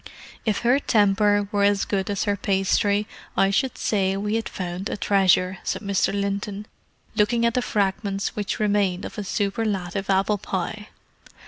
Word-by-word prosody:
"If 210 -2 +1
her 245 +3 +3
temper 205 -3 +3
were 205 - +1
as 200 0 +3
good 195 0 -1
as 200 -1 -1
her 205 -1 +1
pastry, 200 +1 +1 0.3
I 195 0 +4
should 255 +5 0
say 195 -2 0
we 210 +1 -2
had 225 0 -1
found 180 +1 -4
a - - -3
treasure," 190 -2 +2
said - - -3
Mr. 200 -1 +1
Linton, 200 +1 -3 0.5
looking 230 +2 +2
at 235 - +2
the 250 - +1
fragments 200 -2 -1
which 205 -2 -3
remained 200 -3 +1
of - - -7
a - - -3
superlative 195 -2 -2
apple 195 +2 +2
pie. 195 +3 -4
200 Hz, 160 wpm, -24 LUFS, 195-210 Hz, 0.5 s, I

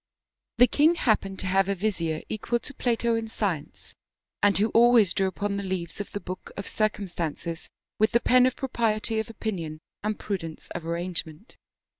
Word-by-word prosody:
The 245 - +8
king 300 +7 +4
happened 210 - +1
to - - -4
have 190 +1 +2
a 200 - +1
vizier 170 -5 -1
equal 225 +2 -1
to 280 - -9
Plato 235 -2 +1
in 225 0 -1
science, 195 -9 -3 0.5
and 205 0 +4
who 210 +3 +3
always 230 -5 +5
drew 195 - +1
upon 200 +1 -2
the 200 - -3
leaves 185 -1 -3
of 205 - -8
the 205 - -3
book 185 -2 -7
of 200 - -4
circumstances 175 -6 -2 0.3
with 215 +1 +5
the 235 - +4
pen 250 +1 +5
of 255 - -1
propriety 225 -4 0
of 220 - -3
opinion 175 -9 -4 0.2
and 210 0 -1
prudence 165 -6 -5
of 170 -2 -6
arrangement. 170 +2 -4
205 Hz, 175 wpm, -27 LUFS, 175-225 Hz, 0.5 s, The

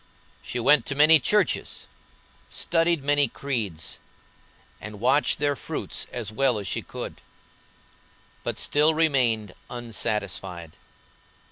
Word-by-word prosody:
She 125 - -5
went 145 +4 +4
to 140 - -2
many 155 +2 +7
churches, 210 +9 0 0.6
studied 165 -3 +1
many 145 0 +3
creeds, 110 - -4 0.8
and 105 -1 -8
watched 130 +6 +3
their 145 -1 0
fruits - - -3
as 115 -4 -5
well 125 +1 +1
as 100 - -5
she - - -2
could; - - -8 1.2
but - - -3
still 150 +2 +2
remained 125 - +1 0.2
unsatisfied. 95 -7 -3
125 Hz, 110 wpm, -25 LUFS, 105-145 Hz, 1.2 s, many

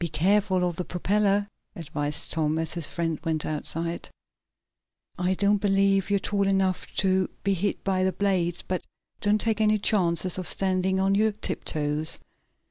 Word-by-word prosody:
"Be 170 - -1
careful 185 +3 +2
of 175 -2 -4
the 180 - -2
propeller," 200 +3 +1 0.3
advised 150 -2 -4
Tom, 155 -1 +1
as 165 -1 -1
his 170 -4 -3
friend 165 -2 -2
went 160 -2 -1
outside. 165 +2 -3 1.1
"I 180 +1 +1
don't 205 +1 +2
believe 195 -1 +2
you're 200 - +3
tall 200 0 0
enough 190 -1 +1
to 190 -1 +2
be 200 - +2
hit 195 +2 -2
by 185 -1 +1
the 190 - +2
blades, 180 -3 0
but 185 -1 -2 0.4
don't 210 +1 +2
take 220 0 0
any 215 0 +4
chances 185 -3 +2
of 185 - -4
standing 190 0 0
on 195 +1 +2
your 215 +1 +3
tiptoes." 155 -6 -2
185 Hz, 160 wpm, -26 LUFS, 170-200 Hz, 1.1 s, any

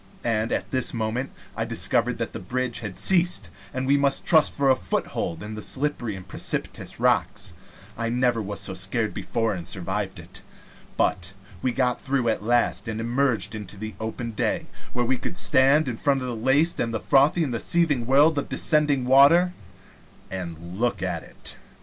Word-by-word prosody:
And 115 -1 0
at - - -2
this 130 -2 +1
moment 115 +4 -2 0.3
I - - -1
discovered - - 0
that - - -4
the - - -5
bridge 120 +5 -1
had 105 -5 -6
ceased, 175 - +3 0.2
and 130 0 -3
we 140 +2 +4
must 140 -1 +1
trust 160 -2 +5
for 140 -1 +2
a - - +5
foothold 85 -8 -3
to 105 - -6
the 110 0 -6
slippery 130 -5 -2
and 95 -1 -10
precipitous - - -2
rocks. - - +1 0.4
I 115 0 -2
never 120 -1 +1
was 100 -1 -4
so 95 - -3
scared 100 +4 -1
before 115 -2 -1
and 85 -3 -6
survived 95 +1 -3
it. 90 +2 -10 0.6
But 90 +1 0 0.3
we 130 - +1
got 125 -1 0
through 130 -3 0
at 110 - 0
last, 120 +2 +1
and 110 -1 -3
emerged 120 0 0
into 105 -2 -7
the 110 +2 -6
open 115 +1 -4
day, 105 - -1 0.3
where 120 -1 0
we 130 +2 +1
could 180 - -4
stand 140 +2 +4
in 120 -3 -3
front 135 0 +1
of - - -3
the 120 - -3
laced 135 +9 +2
and 115 -1 -1
frothy 145 +7 +3
and 120 -6 -2
seething 150 -9 +1
world 145 +3 +5
of - - -5
descending 150 -4 +2
water, 145 +8 +6 0.8
and 85 0 -6
look 120 0 0
at - - -2
it. - - -7
120 Hz, 180 wpm, -25 LUFS, 110-135 Hz, 0.8 s, water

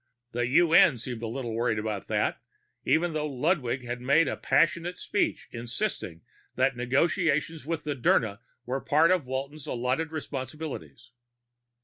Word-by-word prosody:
The 120 0 -1
UN 165 +1 +5
seemed 120 0 -6
a 115 - -3
little 120 0 -4
worried 115 -1 0
about 105 -2 -3
that, - - 0 0.4
even 165 +1 +2
though 150 -1 -1
Ludwig 130 -3 0
had 120 0 -4
made 140 +6 +4
a - - -1
passionate 170 +2 +1
speech 205 - -1
insisting 115 - -4 0.3
that 130 0 +2
negotiations 155 +4 +1
with 165 -1 -2
Dirna 120 -7 +1 0.3
were 130 +2 -2
part 160 +4 +4
of 180 -8 +1
Walton's 135 +3 -4
allotted 130 +6 -1
responsibilities. 140 - -6
135 Hz, 135 wpm, -28 LUFS, 120-160 Hz, 0.4 s, UN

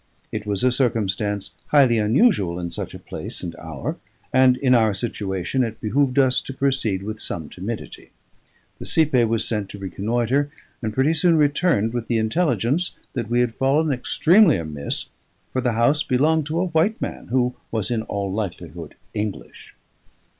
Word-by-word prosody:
It - - -5
was 100 0 -1
a 130 - +4
circumstance 105 -5 -1 0.2
highly 130 -6 +5
unusual 105 - +3
in 85 -1 -4
such - - -5
a - - -6
place - - -7
and 85 -1 -5
hour; 80 -5 -5 0.4
and, 130 -1 +5
in 130 -1 +3
our 110 -4 +4
situation, 100 +1 -2
it 115 -2 -4
behoved 130 +4 +1
us 130 -2 +4
to 135 - -7
proceed 130 -9 0
with 110 +1 -5
some 80 -7 -5
timidity. 105 +5 -7 0.7
The - - -7
cipaye 140 -7 +3
was 115 0 0
sent 105 -4 -2
to - - -8
reconnoitre, 115 +8 0 0.3
and 110 -2 -2
pretty 135 +8 +2
soon 165 +1 +3
returned 145 - +2
with 120 -2 -3
the 115 - +1
intelligence 125 - 0 0.2
that 115 -4 -3
we 120 +1 +3
had 120 -2 0
fallen 145 +5 +2
extremely 170 - +4
amiss, 75 -4 -4 0.5
for 130 - 0
the 120 -2 +1
house 120 +7 +3
belonged 150 +4 +2
to 160 +2 -1
a 185 - +1
white 175 +6 +1
man, - - -5
who 125 0 +1 0.2
was 110 0 -2
in 115 -2 0
all 100 -3 -3
likelihood 85 -6 -5 0.2
English. 105 -1 -6
120 Hz, 170 wpm, -22 LUFS, 105-140 Hz, 0.7 s, highly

